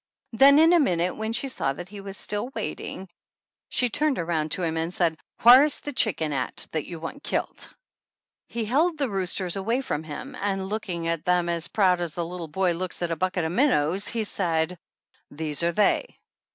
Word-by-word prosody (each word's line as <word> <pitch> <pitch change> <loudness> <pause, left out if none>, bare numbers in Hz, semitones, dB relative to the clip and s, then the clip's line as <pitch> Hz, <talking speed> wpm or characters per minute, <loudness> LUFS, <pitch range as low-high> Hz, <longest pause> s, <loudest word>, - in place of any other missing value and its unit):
Then 275 +5 +7
in 325 +3 +6
a 345 - +6
minute, 180 - +1
when 220 +1 -3
she 235 +4 -1
saw 135 - -1
that 175 +5 -9
he 205 0 -9
was 195 0 -8
still 210 +3 -1
waiting, 190 - -5 0.6
she 250 - +2
turned 295 0 +1
around 165 -2 -1
to 185 - -3
him 165 -1 -1
and 165 +1 -2
said: 170 -3 +1 0.3
"Whar 250 +3 +10
is 300 - +2
the 290 - -6
chicken 165 - +1
at 130 -2 -3
that 155 -2 -3
you 170 -2 -7
want 165 - -7
killed?" - - -3 0.8
He 235 -1 -3
held 310 +9 +2
the 275 -6 -1
roosters 185 -1 -1
away 225 +6 0
from 155 - -3
him 160 - -7
and, 195 -1 -1
looking 180 -6 -3
at 165 -2 -1
them 180 -1 +2
as 170 -2 0
proud 185 -3 +2
as 170 -2 -4
a 170 - 0
little 170 0 -6
boy 180 +4 +1
looks 180 +1 -3
at 170 - -1
a - - 0
bucket 180 +1 -1
of 160 - -2
minnows, 190 - +2
he 230 -2 -1
said: 170 -4 -1 0.5
"These 150 0 -3
are 170 0 +2
they 210 - +1
185 Hz, 205 wpm, -25 LUFS, 165-225 Hz, 0.8 s, Whar